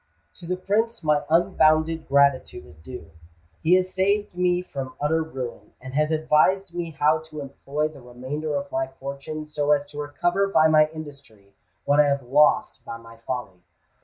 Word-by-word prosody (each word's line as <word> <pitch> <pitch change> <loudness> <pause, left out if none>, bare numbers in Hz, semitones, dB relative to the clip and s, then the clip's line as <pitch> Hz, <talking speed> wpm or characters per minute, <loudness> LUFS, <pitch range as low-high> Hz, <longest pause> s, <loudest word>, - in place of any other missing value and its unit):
"To 170 - -11
the 180 +1 -1
Prince 220 +3 -1
my 150 -1 +2
unbounded 160 -1 +2
gratitude 140 - +2
is 75 +1 -17
due. 80 -2 -10 0.5
He 175 +3 +4
has 185 0 0
saved 200 +2 0
me 180 0 +1
from 135 -6 -7
utter 160 +3 +1
ruin, 130 -7 -7
and 130 0 -10
has 150 +2 +1
advised 160 +4 +2
me 175 -1 -4
how 155 0 +2
to 155 - -8
employ 145 +2 -3
the 150 -3 -13
remainder 130 +5 -5
of 140 0 -4
my 135 0 -1
fortune 140 +3 -7
so 150 -1 +1
as 145 -1 0
to 145 - -8
recover 175 +7 0
by 160 -5 +4
my 155 -1 +5
industry 140 -11 -12 0.3
what 145 +1 +3
I 150 - +6
have 140 -1 0
lost 145 +5 +2
by 115 - -7
my 115 0 -15
folly. 115 -5 -6
150 Hz, 175 wpm, -24 LUFS, 135-160 Hz, 0.5 s, I